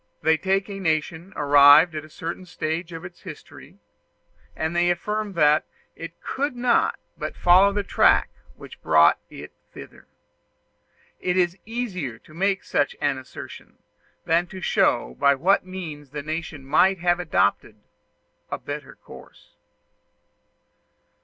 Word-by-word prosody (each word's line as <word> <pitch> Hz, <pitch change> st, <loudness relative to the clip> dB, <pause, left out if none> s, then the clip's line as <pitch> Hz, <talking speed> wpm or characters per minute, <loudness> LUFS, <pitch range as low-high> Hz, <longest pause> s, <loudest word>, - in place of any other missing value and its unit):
They 160 Hz, +1 st, +4 dB
take 190 Hz, +4 st, -1 dB
a 200 Hz, -1 st, -7 dB
nation 160 Hz, +1 st, -2 dB
arrived 145 Hz, +3 st, +6 dB
at 155 Hz, -1 st, -5 dB
a 155 Hz, -, -14 dB
certain 170 Hz, +4 st, -7 dB
stage 165 Hz, +1 st, -4 dB
of 165 Hz, +1 st, -8 dB
its 180 Hz, -1 st, -12 dB
history, 165 Hz, -6 st, -12 dB, 0.8 s
and 160 Hz, +2 st, -3 dB
they 175 Hz, 0 st, +2 dB
affirm 210 Hz, +4 st, -2 dB
that 150 Hz, -3 st, +3 dB, 0.3 s
it 165 Hz, +1 st, -9 dB
could 280 Hz, 0 st, -3 dB
not 245 Hz, -1 st, +1 dB, 0.2 s
but -, -, -5 dB
follow 185 Hz, +3 st, +5 dB
the 205 Hz, 0 st, -2 dB
track -, -, +3 dB, 0.2 s
which -, -, -13 dB
brought 80 Hz, 0 st, +4 dB
it -, -, -10 dB, 0.2 s
thither. -, -, -13 dB, 1.1 s
It 180 Hz, 0 st, -1 dB
is 175 Hz, -1 st, +2 dB
easier 190 Hz, -, -4 dB
to 155 Hz, -, -20 dB
make 195 Hz, +3 st, 0 dB
such 145 Hz, -, -1 dB
an 140 Hz, -2 st, 0 dB
assertion 130 Hz, -, -11 dB, 0.5 s
than 170 Hz, +2 st, +2 dB
to 190 Hz, -, -9 dB
show 60 Hz, -, +1 dB
by 140 Hz, 0 st, +4 dB
what 185 Hz, +6 st, +1 dB
means 160 Hz, -6 st, -8 dB
the 145 Hz, +1 st, -6 dB
nation 155 Hz, -2 st, -6 dB
might 185 Hz, +7 st, +3 dB
have 175 Hz, 0 st, +1 dB
adopted 110 Hz, -, 0 dB, 0.7 s
a -, -, -3 dB
better -, -, -8 dB
course. -, -, -16 dB
170 Hz, 140 wpm, -23 LUFS, 150-190 Hz, 1.1 s, arrived